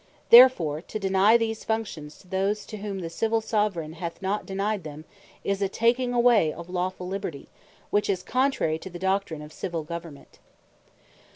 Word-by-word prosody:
Therefore 235 - +7
to 215 - -6
deny 195 +2 +4
these 225 -1 -3
Functions 195 -10 -4
to - - -20
those, 195 +3 -1
to 215 - -8
whom 200 -2 -5
the 170 - -4
Civill 225 +5 0
Soveraigne 205 -8 -1
hath 170 0 -5
not 200 +2 -2
denyed 200 0 -2
them, 155 0 -9 0.4
is 200 0 -1
a 195 - +1
taking 245 +4 +1
away 240 -9 +4
of 170 +1 -9
a - - -12
lawfull 185 0 -3
Liberty, 185 -7 -5 0.4
which 205 0 +1
is 185 -2 0
contrary 255 - 0
to 190 - -8
the 175 - -8
Doctrine 190 -4 -1
of 150 +1 -12
Civill 170 -3 -4
Government. 165 -2 -9
195 Hz, 175 wpm, -26 LUFS, 170-215 Hz, 0.4 s, Therefore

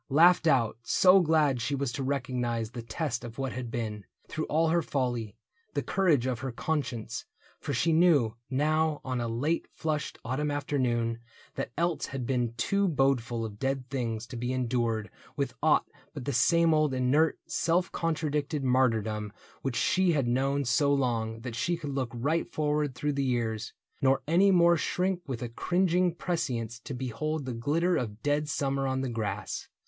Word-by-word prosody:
Laughed 170 +4 +5
out, 120 -7 +2
so 185 +10 +5
glad 155 -7 +2
she 140 +5 -1
was 140 -2 -1
to 115 - -4
recognize 125 -4 -1
The 120 - -6
test 120 +2 -3
of 120 -1 -8
what 135 -1 -2
had 125 -1 -5
been, 110 -3 -4 0.2
through 155 0 -3
all 160 +1 +2
her 170 +1 +3
folly. 120 -8 -2 0.4
The - - 0
courage 170 -10 +2
of 125 -3 -1
her 130 0 -4
conscience; 135 -3 -3 0.3
for - - -4
she 160 +5 +2
knew, 155 -9 +4
Now 155 +3 +1
on 130 -2 -2
a 120 - -1
late 140 +9 -1
flushed 155 -2 -2
autumn 135 +5 -1
afternoon 125 -5 0 0.3
That - - -3
else 170 0 0
had 135 -2 -4
been 120 -2 -1
too 200 - +1
bodeful 130 -5 +1
of 105 -1 -8
dead 135 -1 -2
things 115 -4 -2
To 125 - -9
be 120 +2 -2
endured 120 -4 -1 0.2
with - - -2
aught - - +4 0.3
but - - -6
the 140 - -1
same 165 +7 +4
old 155 -3 +2
Inert, 135 +5 +2
self 175 +2 +1
contradicted 150 -2 -1
martyrdom 110 -5 +1 0.3
Which 135 -3 -2
she 185 +4 +3
had 140 -5 +1
known 135 +3 +1
so 140 +4 +3
long, 115 -5 0
that 125 -2 -6
she 170 +9 0
could 150 -4 -5
look 135 -3 -2
Right 145 +8 -1
forward 150 -3 0
through 150 +3 -1
the 140 0 0
years, 115 -4 -1 0.3
nor 135 0 +3
any 180 +5 +5
more 170 -2 +5
Shrink 180 +2 0
with 125 -3 -4
a 120 - -4
cringing 180 +6 +1
prescience 120 -10 -2
to 140 - -5
behold 135 +4 -3
The 130 - -3
glitter 160 +9 +1
of 110 -3 -4
dead 145 +1 +1
summer 140 -3 0
on 130 0 -1
the 135 - -1
grass. 110 -3 -3
135 Hz, 175 wpm, -29 LUFS, 120-155 Hz, 0.4 s, Laughed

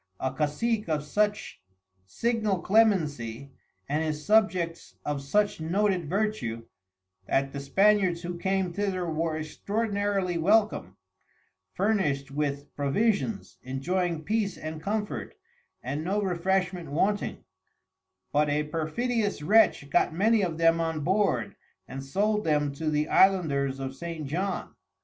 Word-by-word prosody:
A 130 0 -2
Cacic 170 - -1
of 150 -2 0
such 205 - -1 0.5
signal 215 - 0
Clemency, 145 - +1 0.4
and 150 +3 0
his 150 -1 -3
Subjects 185 -6 +1
of 145 -2 -2
such 205 +6 +1
noted 180 -1 0
Vertue, 195 - -1 0.6
that 135 0 0
the 140 - -4
Spaniards 185 +4 +3
who 175 0 -4
came 190 0 -1
thither, 195 -2 -1
were 160 -1 -1
extraordinarily 200 +2 -1
welcom, 200 - +2 0.8
furnished 180 -10 0
with 145 0 -3
Provisions, 200 +8 0
enjoying 165 +5 -2
Peace 210 0 -1
and 155 0 -6
Comfort, 210 +2 -3 0.5
and 140 +5 -3
no 195 +5 0
Refreshment 180 -2 -1
wanting: 200 +8 0 0.9
But 150 0 +2
a 150 +1 +1
perfidious 200 +6 -1
Wretch 205 -5 +4
got 175 - +2
many 215 +4 +3
of 170 -4 -1
them 165 0 +4
on 160 -2 -1
board, 195 +4 +1 0.3
and 135 +1 -6
sold 210 +9 0
them 150 -2 +1
to 155 +2 -2
the 150 0 +1
Islanders 140 -10 +3
of 135 0 -5
St. 165 +1 -6
John. 185 +8 -3
170 Hz, 125 wpm, -27 LUFS, 150-205 Hz, 0.9 s, Wretch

